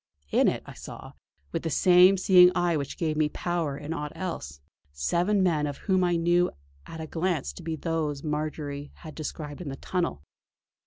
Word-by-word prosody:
In - - +4
it - - 0
I - - -10
saw, - - -10 0.4
with - - -2
the 165 - -2
same 180 +4 +6
seeing 180 -2 +7
eye 175 -1 +2
which 140 -2 -3
gave 155 -2 -1
me 155 -1 +2
power 165 -4 -2
in 150 +2 -5
aught 150 -2 -4
else, 70 - -5 0.3
seven 175 - +1
men 160 -5 +2
some - - -1
of 145 - -6
whom 185 -2 +1
I 175 -1 +2
knew 175 +1 +3 0.4
at 165 - -8
a 160 - -4
glance 160 - -1
to - - -10
be 165 -1 -3
those 155 -3 -2
whom 150 - -3
Marjory 150 -1 -4
had 155 -2 -10
described 150 0 -6
in 160 - -5
the 135 - -5
tunnel. 135 - -2
160 Hz, 200 wpm, -27 LUFS, 145-175 Hz, 0.4 s, seeing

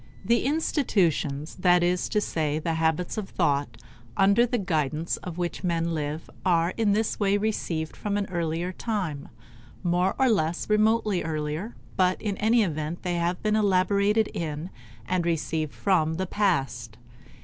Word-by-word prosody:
The 235 +1 +2
institutions 180 - 0
that 180 -1 +4
is 180 0 +1
to 210 - +2
say 155 -7 -1
the 165 +1 -1
habits 160 +5 0
of 195 - -6
thought 145 -5 0 0.4
under 200 +5 +5
the 245 +1 0
guidance 160 - -1
of 180 -2 -8
which 175 +1 -3
men 170 -1 0
live 150 0 -3 0.2
are 170 -2 +2
in 215 -3 +2
this 215 +1 0
way 200 -1 +3
received 175 -7 -2
from 205 -1 -2
an 205 - 0
earlier 170 0 -1
time; 185 -9 -3 0.5
more 180 +2 +1
or 265 - +3
less 170 -7 +1
remotely 215 -2 +3
earlier, 155 +6 -3 0.2
but 185 -1 +2
in 205 -2 -2
any 225 +2 +3
event 155 -1 -3
they 180 - -1
have 175 +1 -1
been 215 0 +2
elaborated 200 +1 +3
in 160 +1 -4 0.4
and 185 -1 +1
received 160 -2 -1
from 160 -5 +1
the 190 +3 -1
past. 135 - -1
180 Hz, 155 wpm, -26 LUFS, 160-205 Hz, 0.5 s, under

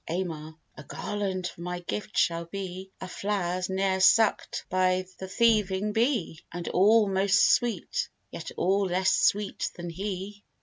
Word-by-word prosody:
AMAR. 160 -3 -4 0.2
A - - -10
garland 195 -3 -3
for 170 - -6
my 180 +1 -3
gift 210 +4 -5
shall 170 0 +2
be, 190 +1 -6
Of 185 - -7
flowers 185 -3 -2
ne'er 190 0 0
suck'd 220 +3 +3
by 185 0 +2 0.2
th' 190 - -6
thieving 210 -2 +2
bee; 225 - 0
And 175 0 -6
all 210 +3 +5
most 195 0 +4
sweet, 240 - 0 0.2
yet - - -7
all 195 +2 +2
less 185 +1 +2
sweet 205 -1 +1
than 175 -1 -6
he. 200 +2 -5
190 Hz, 145 wpm, -27 LUFS, 180-205 Hz, 0.2 s, all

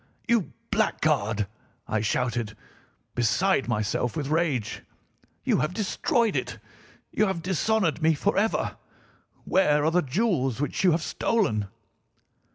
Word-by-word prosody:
"'You 230 -6 +2 0.2
blackguard!' 105 0 +1 0.4
I 110 - 0
shouted, 115 -1 -1 0.6
beside 135 - +2
myself 110 +1 -1
with 145 -2 -2
rage. 155 -8 0 0.6
'You - - +2
have 155 +7 -1
destroyed 225 - +1
it! - - -2 0.5
You 215 - +2
have 180 -4 -2
dishonoured 190 -1 +1
me 160 0 +4
forever! 205 +6 0 0.7
Where 150 -5 +3
are 160 - +3
the 180 +1 +3
jewels 140 - 0
which 145 +5 -1
you 185 - +6
have 165 +1 0
stolen? 140 - 0
155 Hz, 120 wpm, -26 LUFS, 120-195 Hz, 0.7 s, you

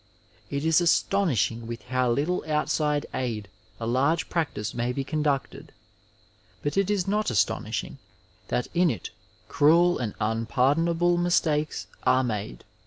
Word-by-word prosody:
It 140 +2 -3
is 160 +1 +4
astonishing 130 - +1
with 115 0 -6
how 130 -1 +1
little 150 +9 0
outside 150 -1 0
aid 115 -6 -3 0.3
a 115 - -4
large 140 +8 +1
practice 145 - -2
may 120 +1 -1
be 135 +2 -2
conducted, 140 -4 -2 0.9
but 145 - -1
it 195 0 +2
is 200 -3 0
not 210 +2 +1
astonishing 110 -6 -1 0.5
that 125 - -1
in 175 0 +3
it 110 - -4 0.4
cruel 170 +4 +4
and 115 -4 -3
unpardonable 145 +11 +1
mistakes 160 -3 +1 0.2
are 130 +1 +3
made. 105 - -4
145 Hz, 130 wpm, -26 LUFS, 120-170 Hz, 0.9 s, is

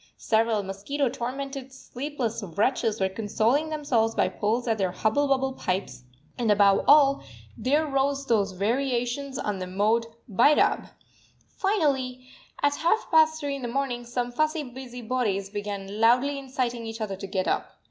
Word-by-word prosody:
Several 220 -1 +1
mosquito 205 +9 -2
tormented, 270 +2 -5
sleepless 260 -3 -4
wretches 220 +4 0
were 190 - +2
consoling 225 +9 0
themselves 260 -8 0
by - - +2
pulls 225 +4 -1
at 225 -2 0
their 190 -2 +1
hubble 220 +10 +1
bubble 265 -1 +1
pipes; 185 - -3 0.3
and 235 -3 0
above 200 -1 +4
all, 280 -1 +6 0.3
there 295 +5 +1
rose 275 -1 0
those 205 -6 +1
variations 245 +5 -1
on 205 -2 -2
the 185 - -4
mode 215 +5 +1 0.2
Bhairab! 240 +8 +3 0.7
Finally, 275 -11 0 0.4
at 285 0 +2
half 390 +7 +1
past 315 0 +5
three 285 -2 -2
in 275 - -7
the 245 - -3
morning, 245 -1 -2
some 245 0 -3
fussy 310 +4 0
busy 250 -1 -9
bodies 210 -5 -1
began 205 -1 -5
loudly 250 +5 +3
inciting 250 -3 -3
each 225 +1 -6
other 210 -3 -3
to 195 +1 -7
get 185 -1 -2
up. - - -1
245 Hz, 155 wpm, -26 LUFS, 215-275 Hz, 0.7 s, all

